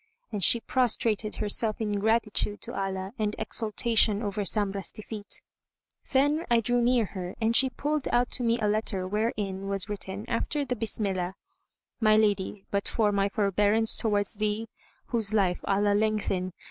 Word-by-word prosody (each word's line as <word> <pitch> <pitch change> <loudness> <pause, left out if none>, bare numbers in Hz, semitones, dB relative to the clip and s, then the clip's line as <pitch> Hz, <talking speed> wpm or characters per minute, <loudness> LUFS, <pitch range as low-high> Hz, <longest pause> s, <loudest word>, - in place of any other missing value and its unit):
And 205 -3 -2
she 235 - +6
prostrated 225 -4 0
herself 215 +1 -1
in 215 -2 -2
gratitude 210 0 0
to - - -7
Allah 190 0 -3
and 210 -1 -1
exultation 220 0 +2
over 205 0 -2
Zamrah's 200 -2 0
defeat. 215 -1 -6 0.7
Then 290 +4 +2
I 235 -1 +4
drew 245 +2 +1
near 240 -1 +3
her, 185 -2 -7
and 225 +1 +1
she 265 +1 +5
pulled 295 +2 -2
out 245 0 +2
to - - 0
me 230 -1 +2
a 215 - +1
letter, 205 -3 0
wherein 200 -2 -2
was 195 0 -2
written, 200 0 -3
after 285 +5 -1
the 250 - -2
Bismillah, 195 -5 -1 0.6
"My 215 -2 +4
lady, 205 -2 0
but 200 0 -1
for 215 -3 +1
my 200 0 +1
forbearance 210 +2 +3
towards 205 -3 +1
thee 215 +1 -1 0.4
(whose 220 -3 +1
life 185 -4 +1
Allah 205 +1 +2
lengthen!) 205 -4 0
210 Hz, 160 wpm, -27 LUFS, 200-225 Hz, 0.7 s, she